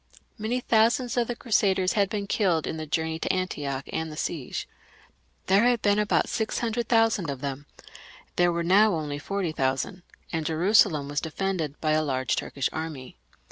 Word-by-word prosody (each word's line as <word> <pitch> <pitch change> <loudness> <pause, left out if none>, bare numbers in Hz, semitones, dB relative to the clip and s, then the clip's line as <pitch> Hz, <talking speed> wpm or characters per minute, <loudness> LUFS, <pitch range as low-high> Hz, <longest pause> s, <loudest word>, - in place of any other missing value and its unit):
Many 235 +4 -1
thousands 235 +3 +2
of 240 -2 +1
the 240 - -3
Crusaders 195 -6 +1
had 200 -2 +2
been 205 -1 -3
killed 185 -6 +1
in 160 - -4
the 155 0 -5
journey 160 +1 -1
to - - 0
Antioch 145 -7 -3
and 160 0 -2
the 150 - -9
siege. 150 -6 -4 0.8
There 195 +4 +4
had 245 -2 +2
been 205 0 +3
about 210 0 +2
six 220 -2 -2
hundred 235 0 -1
thousand 225 -7 +3
of 135 -2 -5
them; 140 0 -5 0.7
there 175 0 +3
were 170 0 -1
now 195 +3 +5
only 150 -2 -3
forty 195 +1 -2
thousand, 135 +5 -1 0.3
and 160 -1 -1
Jerusalem 160 -2 +3
was 145 +1 -2
defended 160 -3 -3
by 155 - 0
a 155 0 +3
large 130 -3 0
Turkish 140 - -2
army. 160 -5 -6
175 Hz, 180 wpm, -26 LUFS, 150-210 Hz, 0.8 s, now